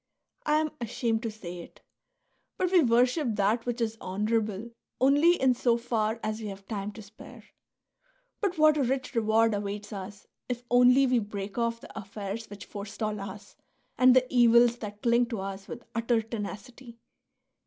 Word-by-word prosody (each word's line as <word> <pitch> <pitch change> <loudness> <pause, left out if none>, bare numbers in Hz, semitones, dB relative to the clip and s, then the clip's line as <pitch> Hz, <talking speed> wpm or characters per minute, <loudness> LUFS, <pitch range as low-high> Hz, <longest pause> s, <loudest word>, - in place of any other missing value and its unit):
I 300 - +3
am 310 0 +1
ashamed 230 -1 -1
to 230 - -3
say 180 -5 -8
it; 170 - -13 0.8
but 365 -1 0
we 365 -2 +6
worship 245 0 +2
that 210 +4 +1
which 245 0 -2
is 225 -1 -2
honourable 210 +2 -2 0.3
only 290 +7 +4
in 260 -1 +4
so 240 -1 +2
far 230 -2 -1
as 215 +1 -3
we 215 - -5
have 195 -1 -9
time 205 -2 -4
to 220 - -10
spare." 205 +2 -14 1.0
But 385 -5 -1
what 310 -1 +5
a 285 - +2
rich 260 +2 -2
reward 225 -1 +3
awaits 205 +1 -4
us 200 +1 -8 0.2
if 245 -1 -3
only 250 +2 +6
we 250 -2 +3
break 205 0 -5
off 230 0 -1
the - - -13
affairs 210 +1 -6
which 205 0 -9
forestall 210 +1 -5
us 200 +1 -9 0.4
and 255 0 +6
the 255 0 +5
evils 240 0 +5
that 210 -2 -8
cling 235 0 +3
to 230 -3 -4
us 195 0 -6
with 240 - -8
utter 230 0 +1
tenacity 230 +2 -7
230 Hz, 170 wpm, -28 LUFS, 205-245 Hz, 1.0 s, we